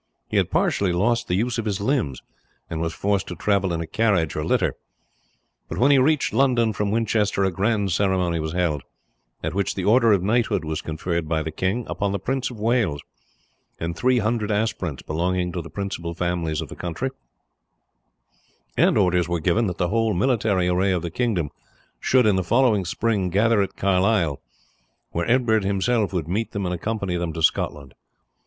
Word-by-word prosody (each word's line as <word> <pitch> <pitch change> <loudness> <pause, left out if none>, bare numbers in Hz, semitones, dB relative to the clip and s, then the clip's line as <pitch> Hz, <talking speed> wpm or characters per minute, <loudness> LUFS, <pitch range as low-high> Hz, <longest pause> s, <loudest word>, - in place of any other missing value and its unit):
He - - 0
had - - +2
partially 100 -3 +1
lost 115 +7 +1
the 90 - 0
use 115 +4 0
of 115 - -3
his 100 -2 -1
limbs, 105 - -1 0.5
and 80 0 -3
was 85 0 -1
forced 100 +2 -1
to 90 - -5
travel 100 +1 +1
in 85 -1 -2
a - - -3
carriage 95 -3 +1
or 75 - -2
litter; - - +1 1.0
but - - -5
when 135 +4 +4
he 140 - +6
reached 150 +2 +2
London 120 -5 +3
from 105 0 -1
Winchester 105 -2 +1
a 95 - +2
grand 100 +2 0
ceremony 90 -2 +1
was 80 0 -3
held, 85 -5 0 0.6
at 80 +1 -2
which 100 +1 -1
the 95 - -3
order 115 +1 +5
of 100 -3 +3
knighthood 105 -4 +1
was 80 0 -3
conferred 80 0 -3
by 80 -1 0
the 80 - -4
king 95 +9 -1
upon 95 +3 -2
the 100 - -1
Prince 130 +6 -2
of 120 -4 -10
Wales, 110 - +1 0.8
and 85 +1 -3
three 130 +6 +2
hundred 110 -1 0
aspirants 105 - -1
belonging 90 +3 -1
to 85 - -3
the 85 - -10
principal 90 -4 -4
families 85 -3 -1
of - - -7
the - - -8
country, 90 +10 -3 1.6
and - - +3
orders 90 -3 +2
were 85 0 0
given 95 +8 +1
that 90 - -4
the 90 - 0
whole 115 0 +1
military 105 -4 +1
array 90 +2 +2
of 90 -2 -1
the 85 - -4
kingdom 95 - -1 0.5
should, 125 -2 +3
in 105 -3 +3
the 95 - 0
following 110 -1 +3
spring, 100 0 0
gather 105 +4 +3
at 100 - -3
Carlisle, 95 -5 +1 0.7
where 85 +6 -2
Edward 115 -4 +3
himself 100 +2 +1
would 85 -5 -2
meet 105 +6 -2
them 100 -1 -2
and 90 - -1
accompany 100 0 -2
them 85 -1 -2
to 80 -1 -4
Scotland. 70 -4 0
95 Hz, 190 wpm, -23 LUFS, 85-110 Hz, 1.6 s, he